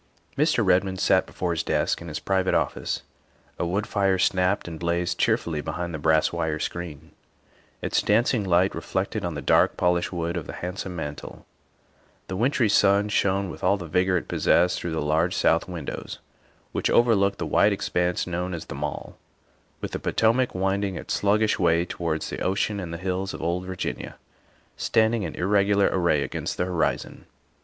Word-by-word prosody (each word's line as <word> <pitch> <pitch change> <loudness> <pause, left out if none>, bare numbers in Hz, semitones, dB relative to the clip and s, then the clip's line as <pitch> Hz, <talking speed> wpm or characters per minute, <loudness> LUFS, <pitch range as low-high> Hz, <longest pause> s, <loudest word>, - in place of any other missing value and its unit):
Mr. 150 -6 +2
Redmond 95 0 +2
sat 95 0 +3
before 90 -2 -3
his 80 -2 0
desk - - 0
in 85 - -8
his 75 -2 -4
private 95 -1 +1
office. - - -1 0.6
A 85 - 0
wood 100 +5 -1
fire 100 -3 +1
snapped 95 +1 +1
and 80 -2 -7
blazed 85 +1 -1
cheerfully 80 -3 +1
behind 85 +3 -4
the 80 - -4
brass 80 +1 +2
wire 80 -1 -1
screen, 85 -2 -6 0.7
its - - +1
dancing 110 +1 +2
light 90 0 +2
reflected 100 +2 -3
on 85 -3 -3
the 70 - -5
dark, - - +3
polished 90 0 +1
wood 85 0 -2
of 80 - -5
the - - -6
handsome 90 0 -5
mantel; 75 -3 -7 0.8
the 95 - -3
win 115 +7 +2
try 135 -4 +1
sun 100 0 +3
shone 100 -1 +1
with - - -11
all 100 +3 +3
the 90 - -7
vigor 90 +3 +2
it - - -4
possessed 90 +1 +2
through 85 - -4
the 80 -2 -1
large 80 +5 +1
south 80 - +2
windows 85 -6 -6 0.5
which - - -1
overlooked 100 -5 +3
the - - -3
wide - - +3
ex - - -2
panse 90 0 0
known 90 +1 -3
as 80 - -7
The - - -7
Mall, - - -5 0.6
with - - -4
the - - -3
Potomac 120 +2 +1
winding 95 +1 0
its - - -4
sluggish 105 +2 +2
way 85 -1 +3
towards 80 -3 -3
the - - -4
ocean 100 +2 0
and 90 -3 -5
the 85 - -4
hills 95 +2 -3
of - - -8
old 90 +2 -1
Virginia 95 -1 -4 0.6
standing 110 0 +2
in 85 -5 -4
irregular 100 +2 +2
array 85 -6 +2
against - - -4
the 90 - 0
horizon. 90 -3 -2
90 Hz, 180 wpm, -25 LUFS, 85-100 Hz, 0.8 s, sat